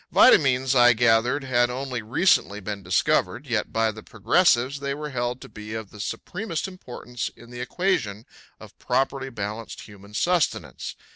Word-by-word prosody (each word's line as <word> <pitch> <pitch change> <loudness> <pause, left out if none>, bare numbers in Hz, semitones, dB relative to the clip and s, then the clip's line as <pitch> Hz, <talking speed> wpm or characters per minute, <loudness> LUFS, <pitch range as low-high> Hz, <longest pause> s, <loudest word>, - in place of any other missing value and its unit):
Vitamines, 130 -2 +5
I 120 -2 +6
gathered, 120 +4 +2
had 120 -2 +2
only 125 -1 -4
recently 115 - +2
been 105 0 -5
discovered, 95 - +1
yet 115 -5 -1
by 115 0 +1
the 110 +1 -10
progressives 130 - +2
they 140 0 -3
were 150 0 -6
held 120 0 -2
to - - -9
be 105 +1 -8
of 110 -3 -6
the 105 - -13
supremest 180 - -4
importance 125 -9 -6
in 120 +1 -15
the 120 0 -7
equation 125 - -1 0.3
of - - -14
properly 135 +1 -1
balanced 110 -1 -6
human 100 0 -13
sustenance. 120 - -1
120 Hz, 155 wpm, -24 LUFS, 110-135 Hz, 0.3 s, I